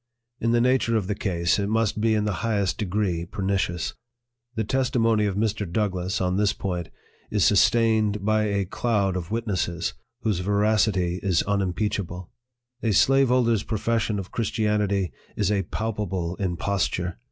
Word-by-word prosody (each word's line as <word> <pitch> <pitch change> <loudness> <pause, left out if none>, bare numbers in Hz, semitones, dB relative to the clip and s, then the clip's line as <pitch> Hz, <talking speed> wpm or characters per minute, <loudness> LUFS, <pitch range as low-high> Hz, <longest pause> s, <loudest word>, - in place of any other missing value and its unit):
In 115 - 0
the 120 0 +3
nature 125 -2 +2
of 105 - -1
the 105 - -1
case, 85 -3 0
it 100 0 -1
must 110 -1 +1
be 110 0 +3
in 105 -1 +1
the 100 -4 -2
highest 105 -5 0
de 105 - 0
gree 90 -3 -1
pernicious. 95 -2 -2 0.6
The 110 - 0
testimony 115 -3 +1
of 100 - -2
Mr. 105 -3 -1
DOUGLASS, 95 -3 -1
on 90 0 0
this 105 0 +2
point, 90 -4 -4 0.4
is 105 -3 +2
sustained 105 0 +3
by 110 0 +2
a 100 -2 0
cloud 100 -1 0
of 90 -2 -4
witnesses, 100 -7 -2 0.3
whose 105 -5 0
veracity 100 -2 +1
is 95 -4 +2
unimpeachable. 100 -2 -2 0.3
" 120 0 -50
A 110 -2 +1
slaveholder's 125 -4 +4
profes 115 +1 0
sion 110 -2 -1
of 95 -2 -6
Christianity 105 -4 0 0.2
is 105 -1 +1
a 100 -2 +2
palpable 100 -6 -2
imposture. 90 -1 -1
105 Hz, 155 wpm, -25 LUFS, 95-110 Hz, 0.6 s, slaveholder's